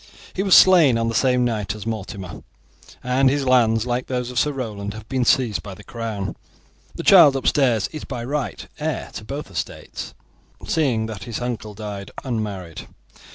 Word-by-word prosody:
He 190 - -2
was 195 -2 +5
slain 165 -10 +7
on 115 0 0
the - - -2
same 125 +1 +2
night 105 -3 -2
as 105 - -8
Mortimer, 100 -4 -5 0.6
and 130 +2 +3
his 140 0 0
lands, 115 -3 +3
like 125 0 -2
those 125 -1 -2
of 125 - 0
Sir 150 - +2
Roland, 105 -6 -5
have 110 0 -10
been 130 -2 0
seized 120 -3 +2
by 100 -2 -9
the 105 - -14
crown. 110 -4 -5 0.6
The - - -5
child 140 - +8
upstairs 130 -5 +2
is 155 - -7
by 125 -3 -5
right 135 - -3
heir - - -3
to - - -7
both 135 -1 -6
estates, 85 - -6 0.5
seeing 130 -9 +1
that 110 -3 -7
his 115 -3 -4
uncle 115 -4 -4
died 100 -2 -6
unmarried. 105 - -4
115 Hz, 175 wpm, -22 LUFS, 105-130 Hz, 0.6 s, child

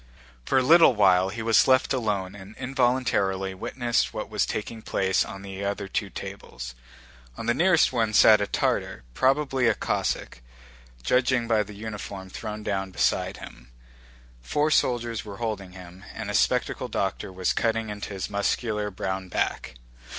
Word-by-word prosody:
For - - +2
a 130 - +4
little 160 -2 +7
while 95 -2 +4
he 110 +3 -5
was 115 -2 +4
left 130 +1 +4
alone 105 -7 -1
and 100 +1 -12
involuntarily 120 -7 0
witnessed 120 +5 -1
what - - -5
was - - +1
taking 110 +1 -4
place 95 -3 +1
on 95 0 -9
the 100 0 -6
other 100 0 -2
two 100 +1 -2
tables. 95 -13 -8 0.6
On - - -6
the 120 - +2
nearest 170 -1 +3
one 115 -3 +1
sat 110 0 +7
a 100 - 0
Tartar, - - -1
probably 135 - +2
a - - +3
Cossack, - - -2 0.6
judging 125 - +2
by 110 -2 +3
the 105 0 -7
uniform 100 -3 -7
thrown 105 0 -6
down 95 -2 -2
beside 95 - 0
him. - - -12 0.7
Four 150 - 0
soldiers 120 -5 +1
were 100 -2 -9
holding 105 -5 -4
him, 90 0 -12
and - - -4
a - - -5
spectacled - - +1
doctor - - -2
was 95 0 0
cutting 115 -1 0
into 105 -1 -6
his 95 - -3
muscular 105 +1 -1
brown 95 -1 -4
back. 65 -6 -2
105 Hz, 160 wpm, -26 LUFS, 95-120 Hz, 0.7 s, little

